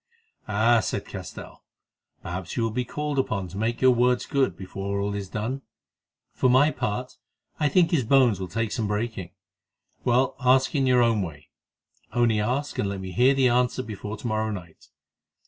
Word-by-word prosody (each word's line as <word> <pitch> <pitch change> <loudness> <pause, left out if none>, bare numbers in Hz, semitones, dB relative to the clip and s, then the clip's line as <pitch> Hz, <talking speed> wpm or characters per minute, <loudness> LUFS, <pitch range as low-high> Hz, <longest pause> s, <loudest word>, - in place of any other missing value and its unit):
"Ah!" 110 +3 +3
said 110 - -3
Castell, - - -9 0.6
"perhaps 90 0 -5
you 115 - +1
will 115 - 0
be 125 +3 -1
called 150 +3 -3
upon 100 -7 -1
to 90 - -11
make 110 +3 -2
your 130 0 +6
words 125 +1 +2
good 135 -2 0
before 100 +1 -4
all 100 0 -1
is 100 -2 -5
done. 115 +7 -3 0.7
For 130 - +2
my 135 +5 +5
part, 125 -1 -3 0.4
I 150 -2 +2
think 170 +3 +3
his 155 -7 +2
bones 120 -4 +4
will 95 - -4
take 115 +2 -2
some 110 -3 -1
breaking. 105 -3 -3 0.7
Well, 125 +2 +2
ask 130 +1 +3
in 135 -3 +1
your 125 -1 +5
own 115 -3 +2
way—only 105 - -4
ask 130 +7 -2
and 100 - 0
let 100 -1 -4
me 95 -1 -6
hear 125 +7 +4
the 130 -2 +4
answer 125 +1 +1
before 105 -1 -6
to 105 - -12
morrow 110 -1 0
night. 90 -6 -8
115 Hz, 180 wpm, -25 LUFS, 100-130 Hz, 0.7 s, your